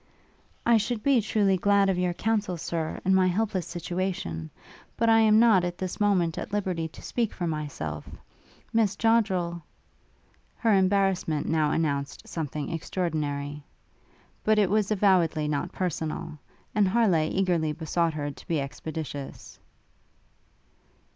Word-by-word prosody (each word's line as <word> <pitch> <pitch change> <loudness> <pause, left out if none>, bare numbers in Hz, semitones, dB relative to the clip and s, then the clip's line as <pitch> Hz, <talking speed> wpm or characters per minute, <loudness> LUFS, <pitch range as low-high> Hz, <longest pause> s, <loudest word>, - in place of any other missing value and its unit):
'I 235 -1 +6
should 220 +1 -2
be 275 -4 +4
truly 200 -2 +2
glad 200 +2 +3
of 190 - +2
your 180 -1 0
counsel, 205 -4 -1
Sir, 160 -1 -3
in 190 - +4
my 190 -1 +4
helpless 190 -1 -1
situation: 175 - -3 0.5
but 230 0 +2
I 225 0 +6
am 215 -1 +5
not 220 -5 +5
at 175 0 -3
this 185 -1 -4
moment 185 -5 +2
at - - -6
liberty 185 -5 -1
to 155 - -14
speak 230 -3 -1
for 180 - -4
myself; 145 - -4 0.6
Miss 220 -3 +2
Joddrel 195 -6 +1 0.5
' - - -37
Her 225 -2 +4
embarrassment 190 -5 +2
now 155 -2 +2
announced 140 -4 -2
something 150 -3 -4
extraordinary; 150 -4 -3 0.8
but 215 0 +3
it 200 -3 +3
was 210 -1 +2
avowedly 185 -7 +2
not 145 -1 -2
personal; 160 -4 -3 0.3
and 210 -2 +3
Harleigh 185 -7 +2
eagerly 175 -5 +1
besought 165 +1 -1
her 145 -1 -3
to - - -15
be 165 -3 0
expeditious. 145 0 -6
180 Hz, 140 wpm, -27 LUFS, 155-205 Hz, 0.8 s, I